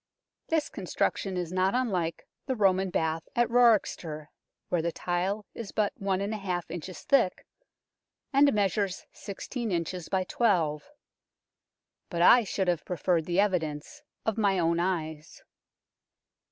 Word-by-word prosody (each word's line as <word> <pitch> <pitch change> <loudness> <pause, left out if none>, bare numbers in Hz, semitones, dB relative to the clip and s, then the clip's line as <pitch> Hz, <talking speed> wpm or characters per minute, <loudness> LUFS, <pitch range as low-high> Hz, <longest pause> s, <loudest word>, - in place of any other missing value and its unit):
This 320 -2 +1
construc 185 -4 -1
tion 190 -2 -4
is 175 -2 -3
not 185 +3 +2
unlike 185 -10 -1 0.2
the 260 - 0
Roman 190 -3 +3
bath 160 -1 -1
at 240 0 +3
Wroxeter, 205 -10 +2 0.4
where 175 - +1
the 170 +1 -1
tile 185 +5 -2
is 230 -4 -7
but 210 -2 0
i 195 -1 -1
inches 175 +2 -7
thick, 240 -10 +2 0.9
and 280 +1 +6
measures 200 -2 0
16 220 +3 -5
inches 175 0 -3
by 190 -1 +1
12. 175 - +1 1.2
But 170 -2 0
I 240 +6 +8
should 190 -2 -2
have 175 -3 +1
preferred 175 -2 0
the 175 +2 0
evidence 160 -7 -1 0.2
of 220 0 0
my 200 -3 +3
own 170 -1 +2
eyes. 160 -4 -3
185 Hz, 130 wpm, -28 LUFS, 170-210 Hz, 1.2 s, I